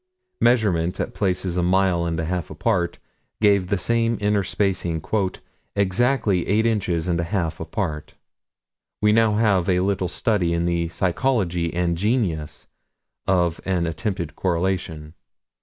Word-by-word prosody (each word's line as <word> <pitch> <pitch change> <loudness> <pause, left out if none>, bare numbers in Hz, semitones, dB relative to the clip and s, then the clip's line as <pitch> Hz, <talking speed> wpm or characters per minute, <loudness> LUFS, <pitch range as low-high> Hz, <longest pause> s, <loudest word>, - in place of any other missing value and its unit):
Measurements 95 -8 +2
at - - -2
places 90 -2 -1
a - - +2
mile 90 -1 +2
and 85 -1 -2
a 80 - -1
half 90 -2 -3
apart, 85 -1 -1 0.4
gave 100 -3 +3
the 100 +1 0
same 115 +2 +1
inter 105 -1 +2
spacing 95 -4 -1 0.8
"exactly 100 -1 +1
eight 110 +3 +2
inches 90 -7 0
and 85 -2 +1
a - - 0
half 85 -3 -2
apart." 80 -2 -4 0.8
We 105 0 +4
now 110 -1 +4
have 100 -5 +2
a 90 -1 +3
little 95 -1 0
study 100 -8 0
in 85 0 0
the 85 -1 0
psychology 90 -2 0
and 85 0 0
genesis 85 - -1 0.6
of 90 -3 +1
an 90 -3 0
attempted 90 -2 -3
correlation. 85 -4 -2
90 Hz, 140 wpm, -23 LUFS, 85-105 Hz, 0.8 s, We